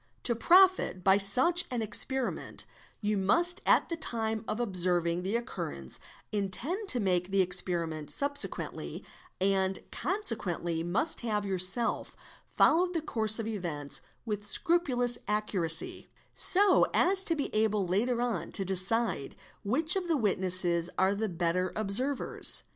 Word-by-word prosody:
To 240 Hz, -, +2 dB
profit 360 Hz, -, +3 dB
by 195 Hz, +1 st, +4 dB
such 260 Hz, -, +4 dB
an 240 Hz, -3 st, -3 dB
experiment, 250 Hz, +4 st, -1 dB, 0.4 s
you 210 Hz, -1 st, -1 dB
must 340 Hz, -, +3 dB
at -, -, +3 dB
the 335 Hz, -, -3 dB
time 225 Hz, -7 st, -1 dB
of 215 Hz, -, -4 dB
observing 180 Hz, -5 st, 0 dB
the 195 Hz, +5 st, -3 dB
occurrence 70 Hz, -, -6 dB, 0.3 s
intend 230 Hz, -, -2 dB
to 250 Hz, -, +8 dB
make 180 Hz, -3 st, -1 dB
the 195 Hz, 0 st, +2 dB
experiment 170 Hz, -4 st, 0 dB
subsequently; 285 Hz, 0 st, -3 dB, 0.3 s
and 190 Hz, 0 st, 0 dB
consequently 210 Hz, -, -1 dB
must 180 Hz, -, -1 dB
have 210 Hz, -3 st, -2 dB
yourself 190 Hz, +4 st, 0 dB, 0.3 s
followed 355 Hz, +3 st, +2 dB
the 330 Hz, -, -1 dB
course 220 Hz, -6 st, +4 dB
of 225 Hz, -2 st, -3 dB
events 150 Hz, -10 st, -4 dB, 0.2 s
with 210 Hz, -3 st, -3 dB
aul -, -, -14 dB
scrupulous 255 Hz, -, 0 dB
accuracy; 190 Hz, -6 st, 0 dB, 0.2 s
so 390 Hz, 0 st, +2 dB
as 380 Hz, +1 st, +3 dB
to 330 Hz, -, +3 dB
be 285 Hz, -, -4 dB
able 215 Hz, -2 st, 0 dB
later 235 Hz, +7 st, -1 dB
on 205 Hz, -9 st, -4 dB
to 195 Hz, -, -1 dB
decide 190 Hz, -4 st, -2 dB, 0.3 s
which 305 Hz, -, +1 dB
of 375 Hz, -2 st, -3 dB
the 325 Hz, -3 st, 0 dB
witnesses 185 Hz, -5 st, +1 dB
are 190 Hz, +1 st, +2 dB
the 215 Hz, +1 st, -3 dB
better 175 Hz, +1 st, -2 dB
observers. 230 Hz, +7 st, +2 dB
210 Hz, 135 wpm, -29 LUFS, 185-255 Hz, 0.4 s, to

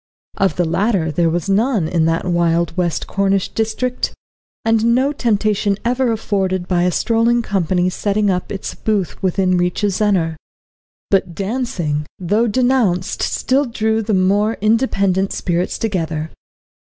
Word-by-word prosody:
Of 190 Hz, -5 st, +1 dB
the 175 Hz, -, +1 dB
latter 180 Hz, -1 st, 0 dB
there 165 Hz, +2 st, +1 dB
was 175 Hz, +3 st, -2 dB
none 205 Hz, -2 st, +1 dB
in 165 Hz, -1 st, +1 dB
that 165 Hz, +2 st, 0 dB
wild 170 Hz, -1 st, +1 dB
west 175 Hz, -3 st, -1 dB
Cornish 195 Hz, -1 st, 0 dB
district, 245 Hz, +3 st, -2 dB, 0.5 s
and 225 Hz, +1 st, +3 dB
no 265 Hz, +3 st, +2 dB
temptation 210 Hz, -5 st, +1 dB
ever 250 Hz, 0 st, +1 dB
afforded 190 Hz, -5 st, -1 dB
by 175 Hz, -1 st, +1 dB
a 180 Hz, -, +2 dB
strolling 230 Hz, +7 st, +2 dB
company 185 Hz, -3 st, 0 dB
setting 205 Hz, +3 st, 0 dB
up 180 Hz, -1 st, -3 dB
its 195 Hz, -, -5 dB
booth 205 Hz, -6 st, -2 dB
within 185 Hz, -1 st, +1 dB
reach 180 Hz, +3 st, -1 dB
of 205 Hz, -, +2 dB
Zennor. 185 Hz, -5 st, +1 dB, 0.7 s
But 185 Hz, -3 st, +1 dB
dancing, 195 Hz, -, -2 dB
though 210 Hz, +6 st, +1 dB
denounced, 230 Hz, -6 st, +1 dB
still 275 Hz, +2 st, +1 dB
drew 220 Hz, -2 st, 0 dB
the 215 Hz, -1 st, 0 dB
more 205 Hz, +4 st, +2 dB
independent 200 Hz, -4 st, +1 dB
spirits 175 Hz, 0 st, -1 dB
together. 160 Hz, -7 st, -2 dB
195 Hz, 140 wpm, -18 LUFS, 175-225 Hz, 0.7 s, and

